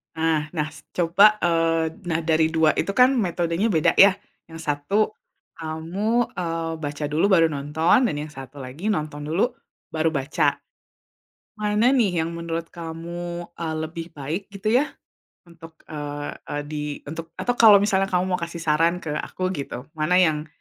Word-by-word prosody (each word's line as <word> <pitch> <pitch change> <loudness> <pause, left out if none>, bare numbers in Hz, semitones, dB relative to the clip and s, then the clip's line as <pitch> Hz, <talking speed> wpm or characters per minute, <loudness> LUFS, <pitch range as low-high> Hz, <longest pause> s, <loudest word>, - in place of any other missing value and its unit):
Nah 160 -1 +1
nah 155 -2 -1
s - - -15
coba 195 +5 +4
eee, 165 -1 +2 0.2
nah 165 -1 0
dari 160 0 +3
2 160 -1 +4
itu 195 - 0
kan 250 +2 +6
metodenya 175 0 0
beda 160 - +4
ya. 195 0 +8 0.3
Yang 165 0 -11
satu 145 +7 -1 0.6
kamu, 175 +9 -1
eee, 165 -2 -2
baca 150 -1 -5
dulu 155 +5 +2
baru 165 -3 +6
nonton 150 +3 +2
dan 150 - 0
yang 155 - -6
satu 135 0 -10
lagi 155 +12 -3
nonton 150 -3 -4
dulu 170 +11 +1 0.4
baru 160 0 +1
baca. 140 +1 +1 1.0
Mana 215 +4 +2
nih 185 -10 +2
yang 165 - -5
menurut 170 0 -5
kamu, 170 +1 -6
eee, 165 -2 -4
lebih 165 +1 -6
baik 150 +7 -3
gitu 205 +3 -2
ya 275 +4 +3 0.6
untuk, 165 -1 -13 0.2
eee 145 -1 -5 0.2
eee, 145 0 -3
di 150 -1 -3 0.3
untuk 165 +1 -8
atau 245 - -1
kalau 215 -3 +9
misalnya 195 -1 +2
kamu 180 -1 +1
mau - - +1
kasih 170 0 -5
saran 165 +3 +2
ke 155 - -4
aku 185 0 -3
gitu, 140 -5 -6
mana 155 +4 +1
yang 160 -4 +3
165 Hz, 165 wpm, -23 LUFS, 155-185 Hz, 1.0 s, kalau